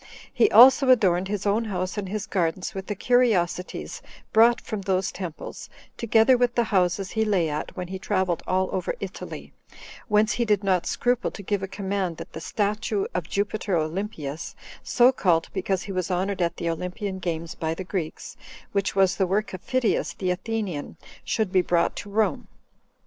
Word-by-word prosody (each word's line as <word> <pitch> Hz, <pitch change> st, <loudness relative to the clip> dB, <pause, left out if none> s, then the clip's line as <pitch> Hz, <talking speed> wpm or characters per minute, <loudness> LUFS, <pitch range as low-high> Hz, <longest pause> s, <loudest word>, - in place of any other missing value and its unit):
He 420 Hz, -, +4 dB
also 260 Hz, +3 st, +8 dB
adorned 190 Hz, -7 st, +4 dB
his 205 Hz, 0 st, -3 dB
own 210 Hz, +3 st, +1 dB
house 185 Hz, -3 st, -3 dB
and 200 Hz, -3 st, -4 dB
his 210 Hz, +1 st, -3 dB
gardens 180 Hz, -2 st, -1 dB
with 190 Hz, -1 st, -6 dB
the 205 Hz, -, -2 dB
curiosities 205 Hz, -7 st, 0 dB, 0.3 s
brought 235 Hz, +2 st, +6 dB
from 215 Hz, -2 st, -5 dB
those 190 Hz, 0 st, 0 dB
temples, 175 Hz, -4 st, -7 dB, 0.3 s
together 230 Hz, +2 st, +4 dB
with 245 Hz, 0 st, +1 dB
the 240 Hz, -, +3 dB
houses 185 Hz, -2 st, 0 dB
he 220 Hz, -, +1 dB
lay 195 Hz, -6 st, +2 dB
at 150 Hz, +5 st, -5 dB
when 180 Hz, -1 st, -5 dB
he 190 Hz, 0 st, -5 dB
traveled 185 Hz, -3 st, 0 dB
all 185 Hz, 0 st, +1 dB
over 190 Hz, -, -2 dB
Italy; -, -, -7 dB, 0.5 s
whence 210 Hz, 0 st, +3 dB
he 240 Hz, -, 0 dB
did 210 Hz, -3 st, +1 dB
not 185 Hz, -3 st, +1 dB
scruple 245 Hz, 0 st, 0 dB
to 200 Hz, -, -10 dB
give 200 Hz, 0 st, -1 dB
a 195 Hz, -, -3 dB
command 190 Hz, -3 st, -3 dB
that -, -, -9 dB
the 160 Hz, -, -7 dB
statue 210 Hz, +2 st, -1 dB
of 175 Hz, -3 st, -3 dB
Jupiter 205 Hz, -2 st, -1 dB
Olympius, 160 Hz, -2 st, -4 dB, 0.3 s
so 245 Hz, 0 st, +4 dB
called 175 Hz, -10 st, +1 dB
because 190 Hz, -2 st, -1 dB
he 200 Hz, -, -6 dB
was 185 Hz, -1 st, -2 dB
honored 185 Hz, +1 st, -1 dB
at 170 Hz, -1 st, 0 dB
the 170 Hz, -, -3 dB
Olympian 180 Hz, +4 st, -3 dB
games 165 Hz, -3 st, -3 dB
by 160 Hz, 0 st, -3 dB
the 190 Hz, -, -5 dB
Greeks, 180 Hz, -4 st, -5 dB, 0.4 s
which 200 Hz, -1 st, -1 dB
was 190 Hz, -1 st, +3 dB
the 190 Hz, -, +2 dB
work 205 Hz, +3 st, -1 dB
of 185 Hz, -, -6 dB
Phidias 255 Hz, -3 st, 0 dB
the 185 Hz, -2 st, -1 dB
Athenian, 190 Hz, -5 st, -4 dB, 0.3 s
should 215 Hz, -4 st, -1 dB
be 185 Hz, -1 st, +4 dB
brought 175 Hz, -1 st, +1 dB
to 205 Hz, -, -6 dB
Rome. 200 Hz, -5 st, 0 dB
195 Hz, 180 wpm, -25 LUFS, 180-215 Hz, 0.5 s, also